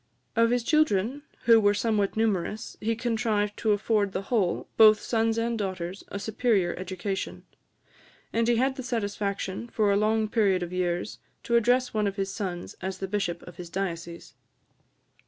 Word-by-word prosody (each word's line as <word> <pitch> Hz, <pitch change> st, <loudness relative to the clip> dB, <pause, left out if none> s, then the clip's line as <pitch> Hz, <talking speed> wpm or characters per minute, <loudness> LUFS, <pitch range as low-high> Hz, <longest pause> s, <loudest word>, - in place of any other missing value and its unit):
Of 230 Hz, 0 st, +4 dB
his 245 Hz, 0 st, +1 dB
children, 275 Hz, -3 st, +2 dB, 0.2 s
who 230 Hz, -1 st, +7 dB
were 205 Hz, -1 st, +3 dB
somewhat 210 Hz, -2 st, 0 dB
numerous 215 Hz, -1 st, -1 dB
he 225 Hz, +1 st, 0 dB
contrived 220 Hz, -3 st, 0 dB
to 220 Hz, -, +1 dB
afford 205 Hz, -1 st, +1 dB
the 190 Hz, -, -2 dB
whole, 195 Hz, -5 st, 0 dB
both 215 Hz, -1 st, +7 dB
sons 225 Hz, -1 st, 0 dB
and 230 Hz, 0 st, -1 dB
daughters, 185 Hz, -1 st, -4 dB
a -, -, -5 dB
superior 205 Hz, -4 st, +1 dB
education; 185 Hz, +1 st, -4 dB, 0.9 s
and 230 Hz, 0 st, +1 dB
he 240 Hz, -, +4 dB
had 265 Hz, +3 st, +1 dB
the -, -, -3 dB
satisfaction, 205 Hz, -3 st, -3 dB
for 215 Hz, -3 st, +1 dB
a -, -, +3 dB
long 215 Hz, +1 st, +2 dB
period 200 Hz, -5 st, +2 dB
of 175 Hz, +1 st, -6 dB
years, 180 Hz, +1 st, -2 dB, 0.2 s
to 235 Hz, -, 0 dB
address 245 Hz, +2 st, +3 dB
one 210 Hz, -2 st, +1 dB
of 195 Hz, -, -3 dB
his 195 Hz, -1 st, -2 dB
sons 180 Hz, -5 st, -5 dB
as 190 Hz, 0 st, -3 dB
the 195 Hz, -, -4 dB
bishop 185 Hz, -4 st, -2 dB
of 175 Hz, -1 st, -12 dB
his 175 Hz, -1 st, -8 dB
diocese. 170 Hz, -2 st, -5 dB
210 Hz, 170 wpm, -27 LUFS, 190-230 Hz, 0.9 s, who